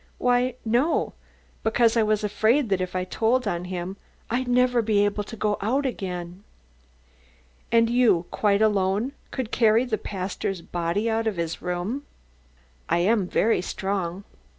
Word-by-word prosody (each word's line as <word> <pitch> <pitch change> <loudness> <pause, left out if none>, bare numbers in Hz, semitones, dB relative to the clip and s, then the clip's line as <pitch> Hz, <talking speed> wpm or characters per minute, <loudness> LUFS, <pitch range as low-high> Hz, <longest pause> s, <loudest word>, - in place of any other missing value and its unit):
"Why, 250 0 +2
no; 245 +9 +1 0.5
because 225 +1 +3
I 230 - +4
was 215 0 +1
afraid 220 +5 +2
that 190 -2 +1
if 185 0 -4
I 185 - 0
told 225 +6 0
on 175 -3 -2
him, 180 +1 -5 0.3
I'd 250 +2 0
never 245 0 +3
be 210 -2 +2
able 205 0 -1
to 225 - -8
go 210 -1 0
out 260 +8 0
again." 180 -5 -4 1.3
"And 230 0 +5
you, 235 -8 +3
quite 205 0 +2
alone, 205 +3 +1 0.2
could 255 -4 -4
carry 225 +1 +4
the 220 -4 -2
pastor's 190 -2 -4
body 175 +5 -1
out 225 0 0
of 210 -5 -1
his 165 -1 -3
room?" 180 +9 -3 0.9
"I 170 - +3
am 195 +2 +2
very 220 +1 +2
strong." 190 -1 -3
210 Hz, 150 wpm, -25 LUFS, 185-235 Hz, 1.3 s, And